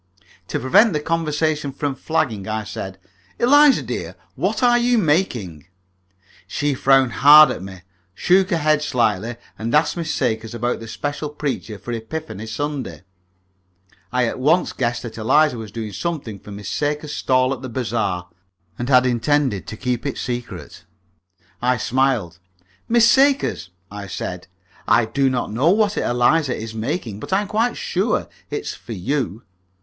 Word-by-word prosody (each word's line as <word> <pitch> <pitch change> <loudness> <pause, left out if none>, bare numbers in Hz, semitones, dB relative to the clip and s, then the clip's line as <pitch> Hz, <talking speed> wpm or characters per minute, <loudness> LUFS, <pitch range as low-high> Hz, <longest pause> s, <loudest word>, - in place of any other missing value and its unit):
To - - -2
prevent 200 - +4
the 150 - 0
conversation 155 -2 -1
from 140 +1 -3
flagging, 125 -9 -2
I 110 0 -2
said, 95 -2 -7 0.4
"Eliza, 290 +3 +5
dear, - - -5 0.2
what - - -1
are 240 0 +5
you 240 0 +2
making?" 125 - 0 0.8
She 145 +8 -1
frowned 135 -1 +3
hard 150 +2 +9
at - - -5
me, 95 -1 -9 0.3
shook 185 - +3
her 170 - +1
head 155 -1 +2
slightly, 115 -4 0 0.2
and 115 +3 -1
asked 150 +1 +3
Miss 165 -2 -3
Sakers 115 -2 -2
about 120 +1 -1
the 115 - -9
special 145 +5 -4
preacher 145 -7 -4
for 100 +5 -8
Epiphany 115 -1 -6
Sunday. 130 - -4 1.1
I 125 0 +2
at 115 - -3
once 160 +7 +2
guessed 120 -1 -2
that 115 -2 -7
Eliza 145 +6 +3
was 110 -3 -8
doing 110 -1 -6
something 135 - -4
for - - -14
Miss 100 -1 -8
Sakers' 150 +4 -2
stall 130 0 +2
at 130 - -8
the 130 - -6
bazaar, 110 -7 -2 0.5
and 120 +2 -3
had 125 -1 +5
intended 125 -2 +1
to 110 - -7
keep 125 +3 -2
it 140 - -3
secret. 120 -1 -6 0.8
I 125 +1 +2
smiled. 120 -8 0 0.5
"Miss 230 0 +5
Sakers," 270 - +3 0.2
I 100 -1 -7
said, 90 -1 -5 0.4
"I 115 - +4
do 135 +4 +1
not 125 -4 -2
know 130 +9 +2
what 205 +1 +2
Eliza 125 +3 +2
is 110 0 -6
making, 110 - -3
but - - -8
I 190 +2 +3
am 205 - -5
quite 225 +4 0
sure 480 0 -1 0.2
it 430 - -3
is - - -5
for 115 - -9
you." 115 - -2
130 Hz, 160 wpm, -21 LUFS, 110-155 Hz, 1.1 s, hard